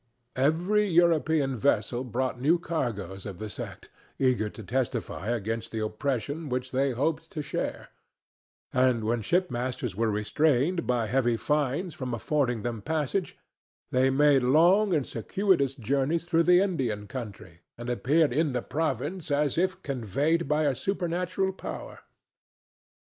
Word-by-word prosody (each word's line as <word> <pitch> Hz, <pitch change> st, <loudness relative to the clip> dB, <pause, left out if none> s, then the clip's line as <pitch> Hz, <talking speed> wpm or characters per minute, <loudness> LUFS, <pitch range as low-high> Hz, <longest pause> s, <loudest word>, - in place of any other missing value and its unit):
Every 175 Hz, +10 st, +2 dB
European 160 Hz, -5 st, +3 dB
vessel 120 Hz, -1 st, +1 dB
brought 125 Hz, 0 st, -2 dB
new 160 Hz, +6 st, +4 dB
cargoes 115 Hz, -, -3 dB
of 95 Hz, -3 st, -7 dB
the 110 Hz, 0 st, -6 dB
sect, -, -, -8 dB, 0.3 s
eager 125 Hz, -5 st, +2 dB
to 110 Hz, -, -10 dB
testify 125 Hz, -3 st, -2 dB
against 115 Hz, 0 st, -2 dB
the 115 Hz, -, -4 dB
oppression 140 Hz, +6 st, -3 dB
which 125 Hz, 0 st, -2 dB
they 135 Hz, +2 st, +1 dB
hoped 155 Hz, +6 st, -1 dB
to 150 Hz, -, -3 dB
share; -, -, -4 dB, 0.8 s
and 125 Hz, -3 st, +3 dB
when 115 Hz, +2 st, 0 dB
shipmasters 125 Hz, -, -1 dB
were 115 Hz, +2 st, +1 dB
restrained 145 Hz, -, +1 dB
by 120 Hz, -2 st, +1 dB
heavy 120 Hz, 0 st, +1 dB
fines 150 Hz, +6 st, 0 dB
from 125 Hz, -4 st, -4 dB
affording 125 Hz, -3 st, 0 dB
them 115 Hz, -3 st, -3 dB
passage, 160 Hz, -, -2 dB, 0.5 s
they 130 Hz, +1 st, +3 dB
made 140 Hz, 0 st, +4 dB
long 175 Hz, +11 st, +4 dB
and 145 Hz, -4 st, +1 dB
circuitous 140 Hz, -, +1 dB
journeys 140 Hz, +6 st, 0 dB
through 170 Hz, -1 st, +3 dB
the 180 Hz, +1 st, +7 dB
Indian 130 Hz, -, -1 dB
country, 105 Hz, -8 st, -8 dB, 0.2 s
and 120 Hz, +1 st, -7 dB
appeared 140 Hz, +4 st, +2 dB
in 150 Hz, 0 st, +1 dB
the 125 Hz, -, -1 dB
province 160 Hz, +3 st, -2 dB
as 145 Hz, -1 st, +1 dB
if 185 Hz, +2 st, 0 dB
conveyed 140 Hz, -, 0 dB
by 150 Hz, +2 st, +2 dB
a 145 Hz, -2 st, +2 dB
supernatural 180 Hz, +3 st, -1 dB
power. -, -, -7 dB
135 Hz, 140 wpm, -28 LUFS, 120-165 Hz, 0.8 s, the